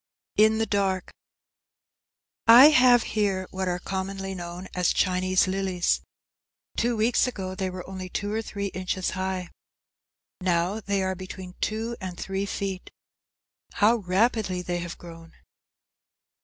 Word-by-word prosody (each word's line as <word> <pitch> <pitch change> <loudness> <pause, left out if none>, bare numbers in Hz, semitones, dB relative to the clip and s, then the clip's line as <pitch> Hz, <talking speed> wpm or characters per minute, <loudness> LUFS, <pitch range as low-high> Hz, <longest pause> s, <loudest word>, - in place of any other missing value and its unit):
"_ - - +9
IN 220 0 +4
THE 225 - +1
DARK 195 -3 -1 1.4
I 245 +6 +10
have 250 -4 +6
here 195 -3 -1
what 190 0 -3
are 180 0 0
commonly 195 +1 -4
known 175 0 -7
as 180 -1 +2
Chinese 185 0 +2
lilies. 185 -2 0 0.7
Two 235 0 0
weeks 225 +4 +3
ago 190 -6 -4
they 190 0 -2
were 180 -1 -7
only 185 -1 -6
two 205 +3 -3
or 220 - 0
three 200 -2 -4
inches 185 0 -2
high. 185 -1 -3 0.9
Now 180 +3 +1
they 200 -2 -1
are 190 0 0
between 185 0 -8
two 225 +2 -2
and 185 -2 -6
three 195 +1 -3
feet. 195 -2 -4 0.8
How 220 +3 +4
rapidly 195 -1 0
they 175 0 -2
have 170 0 -6
grown! 165 -1 -12
190 Hz, 140 wpm, -26 LUFS, 185-210 Hz, 1.4 s, I